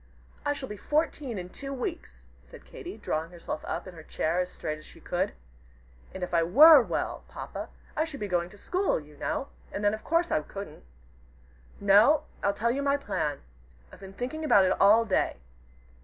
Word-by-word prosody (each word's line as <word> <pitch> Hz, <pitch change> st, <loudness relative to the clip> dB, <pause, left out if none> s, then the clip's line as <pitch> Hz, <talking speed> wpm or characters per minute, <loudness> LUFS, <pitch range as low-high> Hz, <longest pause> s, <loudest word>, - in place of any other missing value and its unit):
"I 290 Hz, -, +1 dB
shall 275 Hz, -2 st, -6 dB
be 210 Hz, -, -7 dB
fourteen 295 Hz, -, -1 dB
in 180 Hz, -1 st, -6 dB
two 275 Hz, +8 st, -7 dB
weeks," 65 Hz, -, -5 dB, 0.2 s
said -, -, -15 dB
Katy, -, -, -9 dB
drawing 160 Hz, +1 st, -2 dB
herself 170 Hz, -3 st, -6 dB
up -, -, -3 dB
in 185 Hz, -, -9 dB
her 165 Hz, -, -11 dB
chair 160 Hz, +2 st, -1 dB
as 180 Hz, 0 st, -1 dB
straight 155 Hz, 0 st, -4 dB
as 155 Hz, -, -14 dB
she -, -, -14 dB
could. -, -, -1 dB, 0.8 s
"And 190 Hz, -, -6 dB
if 180 Hz, -, -4 dB
I 170 Hz, -, +4 dB
were 285 Hz, -, +9 dB
well, -, -, -3 dB
Papa, -, -, -7 dB, 0.3 s
I 310 Hz, -, +2 dB
should 300 Hz, -4 st, -8 dB
be 205 Hz, -, -3 dB
going 175 Hz, -2 st, 0 dB
to 205 Hz, -, -15 dB
school, 370 Hz, -, 0 dB
you 150 Hz, -1 st, -15 dB
know, 265 Hz, -, -3 dB, 0.2 s
and 205 Hz, -, -4 dB
then 205 Hz, 0 st, +3 dB
of 215 Hz, -, -5 dB
course 335 Hz, +1 st, +1 dB
I 155 Hz, -, +2 dB
couldn't. 195 Hz, -, -9 dB, 1.0 s
No, 210 Hz, +10 st, +5 dB, 0.2 s
I'll 200 Hz, -, +2 dB
tell 230 Hz, +4 st, 0 dB
you 275 Hz, +3 st, -1 dB
my 280 Hz, 0 st, +2 dB
plan. 150 Hz, -, -2 dB, 0.5 s
I've -, -, -13 dB
been 195 Hz, -1 st, -10 dB
thinking 260 Hz, +9 st, -4 dB
about 200 Hz, -11 st, +5 dB
it 185 Hz, -, +2 dB
all 215 Hz, +3 st, +6 dB
day. 195 Hz, -, +1 dB
205 Hz, 200 wpm, -28 LUFS, 175-280 Hz, 1.0 s, were